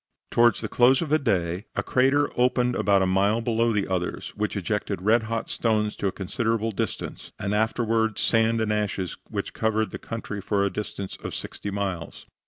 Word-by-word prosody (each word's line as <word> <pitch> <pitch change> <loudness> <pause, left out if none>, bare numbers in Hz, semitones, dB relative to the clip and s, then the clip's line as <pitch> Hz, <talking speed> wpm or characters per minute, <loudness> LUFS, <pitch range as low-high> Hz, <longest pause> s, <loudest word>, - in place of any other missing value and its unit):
Towards 120 0 +4
the - - -2
close 130 +5 +4
of 155 - -5
the 155 +1 +3
day 95 - 0
a - - 0
crater 135 +3 +2
opened 125 0 +2
about 100 -2 +3
a - - +3
mile 100 +4 +2
below 115 0 +1
the 105 -3 0
others, 90 -2 -2
which - - -2
ejected - - -2
red 110 +5 +3
hot 115 -1 -2
stones 105 -2 0
to 100 - -1
a - - 0
considerable 115 +4 -1
distance, 95 - -4
and 100 +1 -2
afterward 110 0 +1
sand 115 0 +2
and 110 -1 +1
ashes 100 -4 -2
which - - -4
covered 110 0 0
the - - -6
country 105 -3 -5
for 100 0 +1
a 100 - 0
distance 100 -2 -5
of - - -4
sixty 105 - -5
miles. 95 -5 -4
110 Hz, 190 wpm, -25 LUFS, 100-115 Hz, -, Towards